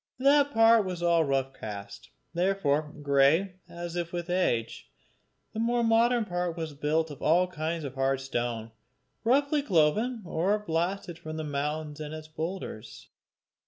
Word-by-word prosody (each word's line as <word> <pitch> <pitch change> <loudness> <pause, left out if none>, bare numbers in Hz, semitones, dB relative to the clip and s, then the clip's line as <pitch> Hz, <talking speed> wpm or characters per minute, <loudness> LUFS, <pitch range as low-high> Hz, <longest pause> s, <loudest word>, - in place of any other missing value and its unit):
That 285 +2 +4
part 225 -1 +6
was 180 -2 -4
all 170 -1 +4
rough 135 -2 0
cast, 105 +2 -8 0.2
therefore 170 -5 +1
grey, 145 +7 +3
as 170 0 -6
if 170 -1 -3
with 175 0 -4
age. 120 -11 -1 0.6
The 220 - -4
more 235 +1 +1
modern 230 +1 +3
part 175 -2 -2
was 160 -2 -4
built 155 +2 0
of 145 - -10
all 175 +4 +4
kinds 165 -1 -3
of 135 -2 -5
hard 135 0 0
stone, 120 -4 -3 0.5
roughly 280 +5 +3
cloven 215 - +2
or 180 +6 +1
blasted 175 -2 -2
from 155 0 -7
the 155 - -3
mountain 150 +1 -3
and 150 +1 -6
its 155 0 -9
boulders. 160 - -6
165 Hz, 150 wpm, -28 LUFS, 145-195 Hz, 0.6 s, part